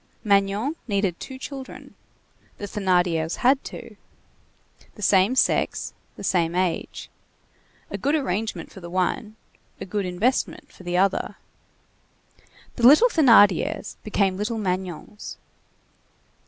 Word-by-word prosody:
Magnon 205 Hz, +8 st, +1 dB
needed 200 Hz, -5 st, 0 dB
two 265 Hz, -, -8 dB
children; 270 Hz, 0 st, -9 dB, 0.6 s
the 205 Hz, -, -5 dB
Thénardiers 180 Hz, -5 st, 0 dB
had 265 Hz, +2 st, +2 dB
two. -, -, -9 dB, 1.0 s
The 210 Hz, -, -9 dB
same 195 Hz, +5 st, +4 dB
sex, -, -, +1 dB, 0.2 s
the -, -, -10 dB
same 170 Hz, -3 st, +1 dB
age. 180 Hz, -2 st, -2 dB, 0.8 s
A -, -, -4 dB
good 285 Hz, +3 st, +1 dB
arrangement 220 Hz, -6 st, -2 dB
for -, -, -11 dB
the 175 Hz, -2 st, -9 dB
one, 185 Hz, +4 st, -1 dB, 0.4 s
a -, -, -5 dB
good 195 Hz, 0 st, -2 dB
investment 205 Hz, +9 st, -1 dB
for -, -, -16 dB
the 175 Hz, 0 st, -2 dB
other. 195 Hz, +1 st, +1 dB, 1.4 s
The 240 Hz, -1 st, +6 dB
little 310 Hz, -, +7 dB
Thénardiers 225 Hz, -, +4 dB
became 200 Hz, -3 st, 0 dB
little 210 Hz, +3 st, -2 dB
Magnons. 185 Hz, 0 st, -4 dB
200 Hz, 115 wpm, -24 LUFS, 185-235 Hz, 1.4 s, little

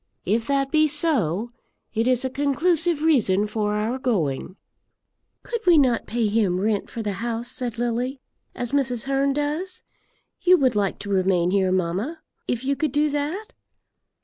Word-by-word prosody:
If 225 Hz, +4 st, 0 dB
that 275 Hz, -1 st, 0 dB
be 310 Hz, -1 st, +4 dB
so, 240 Hz, -, +1 dB, 0.4 s
it 225 Hz, +2 st, 0 dB
is 255 Hz, 0 st, +2 dB
a -, -, 0 dB
conclusive 310 Hz, +3 st, +1 dB
reason 215 Hz, -11 st, +3 dB
for 210 Hz, -1 st, -1 dB
our 220 Hz, +5 st, -1 dB
going." 185 Hz, -, -1 dB, 0.9 s
"Could 470 Hz, -2 st, -4 dB
we 345 Hz, -2 st, +7 dB
not 255 Hz, -5 st, +2 dB
pay 235 Hz, 0 st, 0 dB
him 205 Hz, -4 st, +1 dB
rent 205 Hz, 0 st, 0 dB
for 230 Hz, -, -5 dB
the 205 Hz, -1 st, -2 dB
house," 235 Hz, 0 st, -3 dB
said 245 Hz, -3 st, -4 dB
Lily, 240 Hz, +3 st, -2 dB, 0.4 s
"as 245 Hz, -1 st, -3 dB
Mrs. 260 Hz, -5 st, 0 dB
Hearn 275 Hz, 0 st, +1 dB
does? 300 Hz, +6 st, -3 dB, 0.6 s
You 365 Hz, 0 st, +5 dB
would 260 Hz, -6 st, +2 dB
like 200 Hz, -2 st, 0 dB
to 205 Hz, -, -7 dB
remain 185 Hz, -2 st, +2 dB
here, 190 Hz, -1 st, +2 dB
mamma, 190 Hz, -, -2 dB, 0.2 s
if 245 Hz, 0 st, -2 dB
you 275 Hz, +1 st, 0 dB
could 310 Hz, -1 st, -1 dB
do 295 Hz, +2 st, +1 dB
that?" 305 Hz, +9 st, -3 dB
245 Hz, 165 wpm, -23 LUFS, 210-290 Hz, 0.9 s, we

